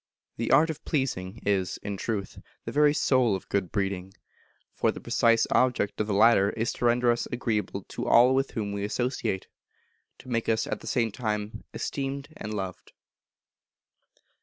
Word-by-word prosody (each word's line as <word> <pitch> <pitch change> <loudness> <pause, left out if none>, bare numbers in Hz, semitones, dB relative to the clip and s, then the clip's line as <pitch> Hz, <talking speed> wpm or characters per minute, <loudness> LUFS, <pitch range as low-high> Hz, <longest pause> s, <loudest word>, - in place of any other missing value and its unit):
The 115 - -2
art 160 +2 +5
of 155 - -10
pleasing 115 - -2
is, 95 -3 0
in 100 - -3
truth, 100 0 -4 0.3
the - - -4
very 150 +1 +4
soul 130 -7 +2
of 95 - -7
good 95 -4 -1
breeding; 95 -1 -2 0.6
for - - +1
the - - -8
precise 115 -1 +3
object 120 -5 +2
of 105 - -1
the 105 - -1
latter 105 -2 +5
is 115 +2 -2
to - - -3
render 120 0 +4
us 120 - -1
agreeable 105 -5 -2
to - - -4
all 125 +2 +6
with 135 +1 +1
whom 105 -3 -3
we 100 0 -3
associate 120 -3 -2 0.7
to - - -16
make 115 -3 -1
us, 110 -1 +2
at - - -3
the - - -11
same 115 -4 +1
time, 105 -1 -4
esteemed 140 0 -4
and 105 - -6
loved. 95 -3 -5
115 Hz, 170 wpm, -27 LUFS, 100-125 Hz, 0.7 s, all